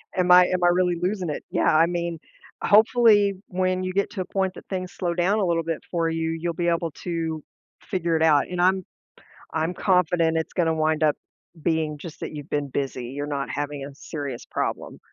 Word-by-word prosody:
Am 180 -1 +2
I 180 0 +9
am 180 -1 -1
I - - +6
really 180 0 +2
losing 185 -2 -1
it? 150 - -4
Yeah, - - +2
I 165 +1 +6
mean, 170 -1 -3 0.4
hopefully 215 -1 +5
when 185 0 0
you 185 0 -3
get 200 +1 +1
to 195 -5 -4
a - - -3
point 190 0 -1
that - - -11
things 185 -2 -4
slow 175 -2 -2
down 185 +5 +1
a 195 - +1
little 165 -1 +1
bit 165 -1 -2
for 165 -2 +1
you, 160 0 -1
you'll 165 +1 -2
be 175 +1 -2
able 170 -1 0
to 165 -3 -3 0.4
figure 170 -3 -1
it 160 - +2
out, 150 -3 +4
and 180 -1 -2
I'm 185 0 +3 0.7
I'm 160 +2 0
confident 170 -3 +2
it's 160 - -2
going 175 -3 +1
to 160 - +2
wind 155 0 +1
up 150 -1 +3 0.5
being 160 -2 0
just 160 +1 -10
that - - -5
you've 145 0 -8
been 145 -1 -1
busy; 130 -3 -3
you're 145 +2 -4
not 140 -2 -3
having 145 -1 -4
a 140 0 -9
serious 140 -4 -6
problem. - - -4
170 Hz, 215 wpm, -24 LUFS, 155-185 Hz, 0.7 s, I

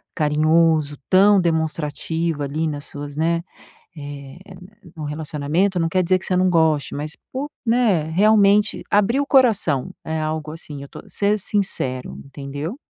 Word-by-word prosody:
carinhoso, 155 0 +2
tão 200 +2 +6
demonstrativo 160 -1 -1
ali 155 +3 -2
nas 145 -1 -5
suas 145 0 -8
né, 165 +2 +1 0.6
eh, 145 0 -9 0.6
num 155 - -7
relacionamento 155 +5 -1
não 165 - +1
quer 185 +2 +1
dizer 185 +1 +2
que - - -12
você 185 - 0
não 185 +1 +3
goste, 160 -4 +2
mas 150 +2 -5 0.2
por 280 +3 -4 0.2
né, 225 -9 +2
realmente 205 +3 +4
abrir 210 +5 +2
o 285 - -1
coração 220 - +3
é 160 0 -3
algo 155 0 -3
assim 150 -3 -8
eu 140 - -10
tô - - -11
ser 205 +1 +1
sincero, 175 -11 -1
entendeu? 145 - -6
160 Hz, 150 wpm, -21 LUFS, 150-190 Hz, 0.6 s, tão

